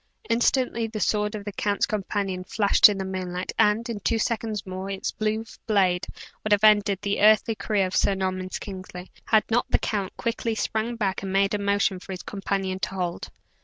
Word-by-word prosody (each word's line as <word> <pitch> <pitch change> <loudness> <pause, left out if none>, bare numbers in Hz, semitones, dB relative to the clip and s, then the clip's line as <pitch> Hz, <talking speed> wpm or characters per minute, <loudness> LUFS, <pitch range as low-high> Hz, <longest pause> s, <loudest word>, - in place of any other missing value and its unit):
Instantly 235 -1 +1
the 220 -1 -5
sword 210 0 0
of 205 -1 -7
the 205 - -4
count's 200 0 0
companion 195 -2 -2
flashed 200 +2 +5
in 205 - -2
the 190 - -3
moonlight, 185 -1 -4
and, 215 +3 +3
in 230 -3 -4
two 230 +3 0
seconds 220 -2 -2
more, 185 +1 -5
its 195 -1 -3
blue 215 +1 -2 0.2
blade 190 -4 +2 0.4
would 215 - -3
have 205 0 +4
ended 205 -2 +5
the 200 0 -1
earthly 215 +2 +5
career 200 -1 0
of 185 - -4
Sir 195 - +3
Norman 185 -1 -2
Kingsley, 185 -2 -7
had 220 -1 +4
not 240 +2 +1
the - - +4
count 200 -3 -3
quickly 230 -1 -2
sprang 220 +2 -2
back, 200 -4 -1
and 195 -1 -4
made 195 +1 +2
a 210 - 0
motion 200 -1 +1
for 190 - -8
his 185 - -7
companion 195 -1 -3
to - - -2
hold. 180 -2 -3
200 Hz, 200 wpm, -25 LUFS, 190-215 Hz, 0.4 s, flashed